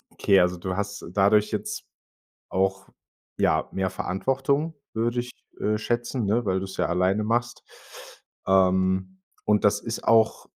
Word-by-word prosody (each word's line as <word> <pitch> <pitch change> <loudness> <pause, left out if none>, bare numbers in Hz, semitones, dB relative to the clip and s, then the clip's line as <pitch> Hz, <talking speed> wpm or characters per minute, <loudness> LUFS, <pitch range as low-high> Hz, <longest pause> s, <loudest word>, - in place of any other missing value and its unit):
okay, 100 -1 +3
also, 90 0 +1
du 95 +1 -4
hast 100 0 -4
dadurch 105 +2 +3
jetzt - - -4 0.7
auch, 95 0 -1 0.5
ja, - - +2
mehr 95 0 -1
Verantwortung, 135 - -1 0.2
würde 120 +2 0
ich, 125 +1 -7 0.3
äh, 105 0 0
schätzen, 120 +1 -2
ne, 115 +4 +1
weil 95 -1 +1
du - - -4
es 95 - -9
ja - - +2
alleine 95 +4 +1
machst. 120 +2 -1 0.8
Ähm, 95 0 +2 0.2
und 105 -1 +2
das 100 0 +3
ist 115 +1 -5
auch 115 -1 +3
100 Hz, 145 wpm, -25 LUFS, 95-115 Hz, 0.8 s, okay